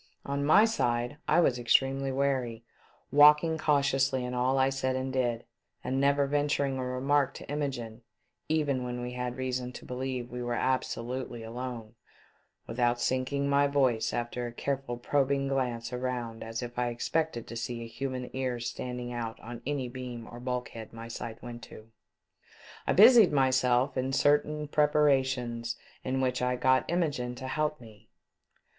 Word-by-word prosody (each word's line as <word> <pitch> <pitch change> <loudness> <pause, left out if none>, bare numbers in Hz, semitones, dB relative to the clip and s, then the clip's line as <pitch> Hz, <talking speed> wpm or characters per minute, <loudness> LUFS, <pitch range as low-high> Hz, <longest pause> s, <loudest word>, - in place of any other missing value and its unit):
On 140 0 -2
my 155 +9 +6
side, 120 - 0
I 175 +3 +5
was 125 -7 +2
extremely 135 +3 +2
wary, 130 -4 -1 0.5
walking 150 +2 +6
cautiously 135 -3 +2
in 125 - -4
all 125 +2 +1
I 135 0 +3
said 130 -1 -1
and 130 0 -3
did, 120 -3 0 0.4
and 130 +2 -1
never 140 0 +3
venturing 145 -1 0
a - - -2
remark 135 +2 +1
to - - -9
Imogene, 130 -6 -4 0.5
even 145 -5 +1
when 125 0 -4
we 125 0 -4
had 125 0 -4
reason 130 -1 -2
to - - -10
believe 130 -1 -3
wc 125 0 -7
were 120 0 -1
absolutely 125 -1 -2
alone, 115 -1 -6 0.7
without 120 +1 0
sinking 130 +3 0
my 140 0 +4
voice 130 -5 +2
after 120 0 -3
a - - -6
care 135 +3 -1
ful 120 -3 -6
probing 140 +2 +1
glance 125 -3 -2
around 125 -2 -3
as 115 +2 -4
if 120 0 -6
I 125 - +1
expected 120 +2 -1
to 115 - -8
see 115 0 -4
an - - -7
human 125 +2 -5
ear 130 -2 -1
standing 125 +1 -5
out 115 -2 -4
on 120 +1 -8
any 140 -3 -1
beam 125 -2 -7
or 120 - -9
bulkhead 125 -3 -5
my 115 0 -8
sight 115 0 -7
went 120 -1 -7
to, 110 +1 -14 1.0
I - - +3
busied 225 0 +8
myself 130 -1 +2
in 130 +1 -1
certain 150 +2 +2
preparations 130 -6 +1 0.3
in 130 +1 -1
which 125 -1 0
I 125 0 +1
got 130 +1 +2
Imogene 145 -8 -1
to 130 +2 -7
help 150 +2 -1
me. 110 -3 -16
130 Hz, 165 wpm, -29 LUFS, 120-140 Hz, 1.0 s, busied